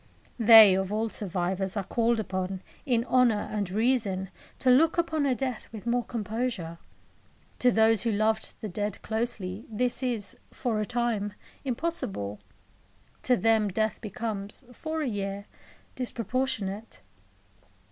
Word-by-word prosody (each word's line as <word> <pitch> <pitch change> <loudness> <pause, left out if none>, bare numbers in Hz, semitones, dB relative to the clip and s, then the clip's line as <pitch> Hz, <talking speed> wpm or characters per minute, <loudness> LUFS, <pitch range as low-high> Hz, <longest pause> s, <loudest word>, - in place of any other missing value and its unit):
They, 220 -3 +9
of 190 +1 0
all 220 +2 0
survivors, 190 0 -2
are 200 - 0
called 230 +3 +1
upon, 190 -2 -3 0.2
in 235 -2 +2
honour 245 -5 +3
and 205 -3 -2
reason, 205 -3 0 0.3
to 255 - +3
look 315 +7 +4
upon 315 -4 +1
a 260 - +2
death 255 -3 -3
with 220 -2 -9
more 240 +1 +1
composure. 220 -7 -3 0.8
To 250 - +5
those 220 -2 +4
who 230 - 0
loved 220 +1 0
the 215 - -3
dead 205 +1 -3
closely, 220 -3 -2
this 245 +4 -1
is, 240 -6 -2
for 230 -4 -2
a 210 - -1
time, 235 -4 -1 0.3
impossible. 235 - -3 0.8
To 250 -1 +3
them 220 -2 +3
death 215 +2 -1
becomes, 210 +1 -5
for 315 +4 -3
a - - -1
year, 200 -2 -3 0.5
disproportionate. 230 -4 -3
220 Hz, 135 wpm, -28 LUFS, 200-245 Hz, 0.8 s, They